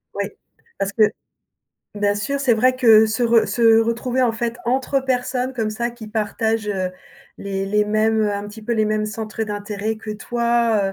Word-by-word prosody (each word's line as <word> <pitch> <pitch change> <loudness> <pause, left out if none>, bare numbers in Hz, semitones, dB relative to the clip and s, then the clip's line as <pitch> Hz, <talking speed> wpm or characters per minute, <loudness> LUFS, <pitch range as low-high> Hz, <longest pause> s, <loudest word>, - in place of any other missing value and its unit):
Oui, - - -1 0.5
parce 195 +1 -2
que 215 - +4 0.9
bien 205 0 +1
sûr, 275 +7 -2
c'est 255 -4 +3
vrai 255 +3 +3
que 220 -3 +6
se 215 +3 -2
re 235 -1 +4
se 225 -1 +4
retrouver, 235 +3 0
en 240 -2 +2
fait, 235 +1 -3
entre 265 +2 0
personnes 255 0 -1
comme 225 -3 -2
ça, 235 +2 -2
qui 235 -2 -11
partagent, 220 0 -1
heu, 190 -3 -1 0.5
les 195 -1 -3
les 210 +1 +2
mêmes, 215 +1 +1
heu, 210 -1 +1
un 200 0 -4
petit 215 +1 -11
peu, 235 - -2
les 220 -2 +2
mêmes 215 0 0
centres 220 +1 -5
d'intérêt 210 +1 -3
que 215 0 -8
toi, 235 -2 0
220 Hz, 185 wpm, -21 LUFS, 210-235 Hz, 0.9 s, que